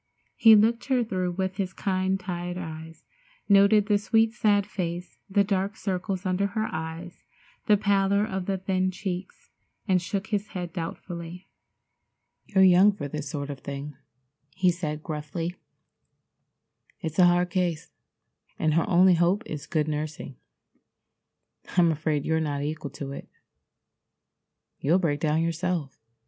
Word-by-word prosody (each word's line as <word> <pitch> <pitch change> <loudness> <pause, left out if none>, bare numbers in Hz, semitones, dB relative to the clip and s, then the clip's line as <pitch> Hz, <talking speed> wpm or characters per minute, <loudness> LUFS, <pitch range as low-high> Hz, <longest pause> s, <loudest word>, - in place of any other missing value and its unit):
He 225 -1 +8
looked 225 +3 +3
her 260 -3 +2
through 185 -5 -2
with 190 +1 -2
his 190 -3 -2
kind 190 0 0
tired 180 -1 -4
eyes, 160 -2 -8 0.4
noted 200 +1 +5
the 205 -1 +2
sweet, 225 +2 +2
sad 205 -4 +2
face, 180 -3 -5
the 200 +1 +3
dark 200 +1 -1
circles 190 0 -3
under 185 +2 +1
her 215 +1 -2
eyes, 160 +2 -6 0.4
the 210 -2 +6
pallor 200 0 +2
of 190 -3 -4
the 195 -1 0
thin 185 0 0
cheeks, 185 0 -6 0.4
and 185 -2 +3
shook 195 +3 -3
his 205 0 0
head 175 -2 -5
doubtfully. 170 +1 -6 1.0
"You're 190 -2 +4
young 190 +3 +6
for 145 -7 -5
this 150 0 -5
sort 145 -2 -4
of 140 - -8
thing," 140 +2 -6 0.6
he 185 -1 +3
said 155 -3 -4
gruffly. 160 +3 -4 1.5
"It's 160 +1 -4
a 180 - +8
hard 175 0 +2
case, 175 -4 -1 0.7
and 155 -1 +1
her 165 +4 +1
only 185 0 +6
hope 175 +6 +2
is 150 -7 -6
good 155 -2 0
nursing. 150 -2 -4 1.4
I'm 170 -2 +5
afraid 155 -2 -1
you're 160 0 +1
not 145 -3 -2
equal 150 -1 -4
to 140 -1 -7
it. 140 - -8 1.5
You'll 160 +6 +3
break 155 -6 0
down 155 +1 +1
yourself." 165 -3 -2
180 Hz, 145 wpm, -26 LUFS, 160-195 Hz, 1.5 s, He